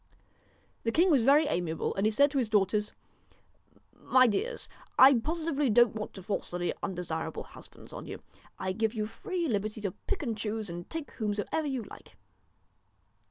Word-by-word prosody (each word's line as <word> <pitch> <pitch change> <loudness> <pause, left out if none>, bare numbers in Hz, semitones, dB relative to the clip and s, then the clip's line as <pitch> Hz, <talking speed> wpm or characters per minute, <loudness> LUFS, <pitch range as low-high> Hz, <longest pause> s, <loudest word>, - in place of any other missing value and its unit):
The 230 - 0
king 345 +8 +4
was 275 -5 +5
very 285 +6 +5
amiable, 175 - -1
and 195 +2 +1
he - - +4
said 280 +6 +4
to 275 - +1
his 235 -4 0
daughters: 210 0 +2 1.0
'My 255 0 +4
dears, 450 - 0 0.3
I 270 +2 +9
positively 310 0 -1
don't 240 0 +5
want 215 -1 -6
to 190 - -9
force 195 +2 -3
any 175 0 -1
undesirable 175 -4 -3
husbands - - -13
on - - -7
you. - - -8 0.3
I 190 - -2
give 220 +3 -1
you 215 -1 -1
free 345 - -3
liberty 215 -2 -1
to 200 -3 -2
pick 380 - -4
and 230 -5 -2
choose 215 -2 -3
and 175 0 -7
take 325 -2 -5
whomso 210 -2 -2
ever 315 -2 0
you 265 -4 -2
like.' 200 - -13
220 Hz, 175 wpm, -30 LUFS, 205-280 Hz, 1.0 s, I